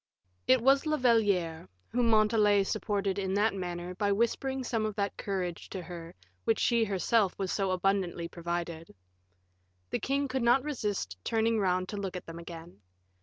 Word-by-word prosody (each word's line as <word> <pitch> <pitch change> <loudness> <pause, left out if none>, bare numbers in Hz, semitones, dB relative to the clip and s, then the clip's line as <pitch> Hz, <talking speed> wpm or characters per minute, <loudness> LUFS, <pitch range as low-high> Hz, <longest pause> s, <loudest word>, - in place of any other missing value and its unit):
It 255 -2 +5
was 275 +3 +4
La 305 0 +2
Valliere 200 - +2 0.2
whom 240 -1 +1
Montalais 215 -2 +4
supported 200 -1 -1
in 190 0 -1
that 210 +1 +3
manner 180 -1 -4
by 200 +2 0
whispering 260 +5 0
some 230 -3 -1
of 215 -1 -2
that 200 -1 -1
courage 185 -4 -4
to 185 -2 -5
her 170 -1 -9 0.3
with 225 - +2
which - - -5
she 235 -2 +3
herself 200 0 +1
was 190 -2 -2
so 195 -2 0
abundantly 185 -2 0
provided. 170 -1 -5 1.0
The - - 0
king 280 +1 0
could 260 0 -2
not 240 +3 +4
resist 205 - -3
turning 225 0 +1
round 185 -2 +1
to 205 - -4
look 195 -2 -4
at - - -9
them 165 0 -8
again. 170 - -10
200 Hz, 170 wpm, -30 LUFS, 180-230 Hz, 1.0 s, It